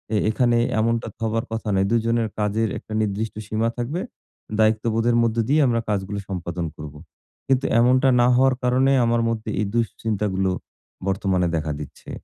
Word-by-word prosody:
এ - - +3
এখানে 120 +1 +2 0.2
এমনটা 115 0 0
তো - - -61
হবার 115 +1 -1
কথা 115 -1 -4
নয়। 95 0 +2
২ - - +4
জনের 115 -1 +1
কাজের 105 +1 0
একটা 110 - -9
নির্দিষ্ট 105 +1 -2
সীমা 110 +2 0
থাকবে। 140 +10 -2 0.6
দায়িত্ববোধের 110 +2 +2
মধ্য 115 0 0
দিয়ে 150 +1 +4
আমরা 115 -1 +1
কাজগুলো 100 0 -2
সম্পাদন 85 -2 -3
করবো। 75 -1 -9 0.5
কিন্তু 135 0 +2
এমনটা 130 +2 +4
না 120 - +5
হওয়ার 130 0 +4
কারণে 130 +2 +3
আমার 115 0 +2
মধ্যে 110 -1 -3
এ - - +1
দুশ্চিন্তাগুলো 105 -4 -1 0.6
বর্তমানে 95 -2 +1
দেখা 80 -1 -2
দিচ্ছে। 75 - -10
110 Hz, 160 wpm, -23 LUFS, 100-120 Hz, 0.6 s, না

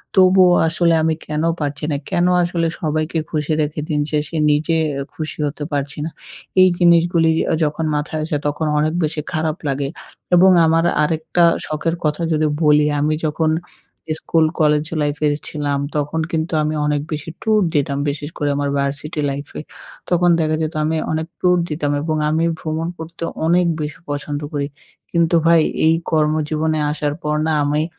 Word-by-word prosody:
তবুও 185 -1 +6 0.2
আসলে 170 +1 +2
আমি 160 0 +2
কেন 150 +1 -2 0.2
পারছি 145 -1 -3
না? - - 0
কেন 175 - +1 0.2
আসলে 170 -1 0
সবাইকে 155 +1 -1
খুশি 150 -1 -2
রেখে 150 0 -2
দিন 150 -2 +1
শেষে 150 +1 -2 0.2
নিজে 155 +3 +1 0.2
এ - - -2
খুশি 155 -1 -5
হতে 145 +1 -5
পারছি 140 -1 -2
না? - - -3 0.5
এই 185 - +8
জিনিসগুলি 170 -1 +4 0.2
আ - - +2
যখন 150 +1 -1
মাথায় 150 +1 -2
আসে, 155 - -2
তখন 150 +2 -1
অনেক 155 +1 +1
বেশি 150 0 -1
খারাপ 155 -1 -1
লাগে। 140 0 -1 0.5
এবং 185 +2 +7
আমার 165 +1 +3 0.2
আরেকটা 160 +2 +1 0.2
শখের 155 +2 -1
কথা 150 +2 0
যদি 155 0 +2 0.2
বলি। 150 0 +5
আমি 150 +2 +1
যখন 155 +1 +1 0.7
স্কুল 165 -1 +2
কলেজ 150 -1 +3 0.2
লাইফের 150 0 0
ছিলাম, 145 -2 -2 0.2
তখন 150 +2 -1
কিন্তু 160 +1 -2
আমি 155 +1 -1
অনেক 150 -1 0
বেশি 155 +1 -4
ট্যুর 215 -1 +2
দিতাম। 140 -1 +1
বিশেষ 145 +1 -4
করে 145 - 0
আমার 145 0 -1
ভার্সিটি 145 +3 -2
লাইফে। 140 +1 -6 0.5
তখন 175 0 +3
দেখা 155 -1 +1
যেত 155 0 -2
আমি 160 +1 0
অনেক 160 0 -2
ট্যুর 180 -1 +3
দিতাম 150 -2 -1
এবং 155 +1 -1
আমি 160 +2 +1
ভ্রমণ 160 +1 -3
করতে 165 +1 -8 0.2
অনেক 175 +2 +3 0.2
বেশি 150 -1 -5
পছন্দ 145 0 -3
করি। 140 -1 -1 0.4
কিন্তু 170 0 +2
ভাই, 165 -1 +6 0.3
এই 160 - +5 0.2
কর্মজীবনে 155 0 +1
আসার 150 -1 -2
পর 150 0 0
না - - +1
আমি 150 +1 +1
155 Hz, 165 wpm, -19 LUFS, 150-165 Hz, 0.7 s, এই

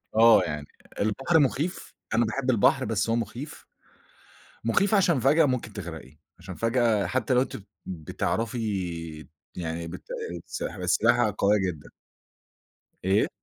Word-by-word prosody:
آه، 115 +1 +7
يعني 75 -1 -4 0.3
البحر 135 +11 +2
مخيف، 150 +5 -1 0.2
أنا 115 +1 +3
باحب 130 +4 -2
البحر 130 +3 +3
بس 110 0 0
هو 115 - +2
مخيف. 120 +5 -5 1.0
مخيف 185 - +2
عشان 180 -8 +4
فجأة 140 +6 +4
ممكن 125 -5 -2
تغرقي، 80 -8 -8 0.2
عشان 90 +1 -8
فجأة 115 -2 +2
حتى 130 - 0
لو 125 - +4
أنتِ 135 - -3
ب - - -11 0.2
بتعرفي 90 -3 -3 0.3
يعني 85 -1 -4
بتأ 475 - -8 0.3
س - - -5
في - - -4
السباحة 120 -5 +2
قوية 105 +1 +4
جدًا. 75 -4 -14 1.1
إيه؟ 95 +2 +3
115 Hz, 135 wpm, -26 LUFS, 95-130 Hz, 1.1 s, آه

